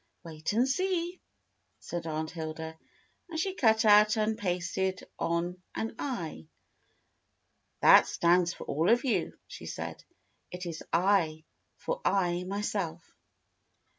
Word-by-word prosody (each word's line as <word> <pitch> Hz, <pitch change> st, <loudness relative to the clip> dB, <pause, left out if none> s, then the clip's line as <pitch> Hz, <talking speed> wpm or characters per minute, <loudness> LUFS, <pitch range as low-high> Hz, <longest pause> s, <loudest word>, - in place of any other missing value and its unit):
"Wait 160 Hz, -2 st, -4 dB
and 235 Hz, +5 st, +3 dB
see," 360 Hz, +3 st, -1 dB, 0.6 s
said 170 Hz, -1 st, -5 dB
Aunt 155 Hz, 0 st, -3 dB
Hilda, 160 Hz, -1 st, -6 dB, 0.5 s
and 320 Hz, -1 st, -4 dB
she 380 Hz, +3 st, -1 dB
cut 220 Hz, -9 st, +3 dB
out 210 Hz, +1 st, +6 dB
and 215 Hz, 0 st, +1 dB
pasted 185 Hz, -1 st, -2 dB, 0.2 s
on 175 Hz, +2 st, -1 dB
an 225 Hz, -, -3 dB
I. 170 Hz, -, -4 dB, 1.3 s
"That -, -, +8 dB
stands 175 Hz, 0 st, +3 dB
for -, -, -9 dB
all 160 Hz, +5 st, 0 dB
of 240 Hz, +1 st, +4 dB
you," 250 Hz, -, 0 dB
she -, -, -10 dB
said. -, -, -6 dB, 0.5 s
"It 180 Hz, +1 st, -7 dB
is 165 Hz, -2 st, -5 dB
7, 170 Hz, -3 st, +2 dB, 0.3 s
for -, -, -3 dB
I, 180 Hz, -2 st, +1 dB
myself." 190 Hz, -4 st, -3 dB
180 Hz, 125 wpm, -30 LUFS, 165-220 Hz, 1.3 s, That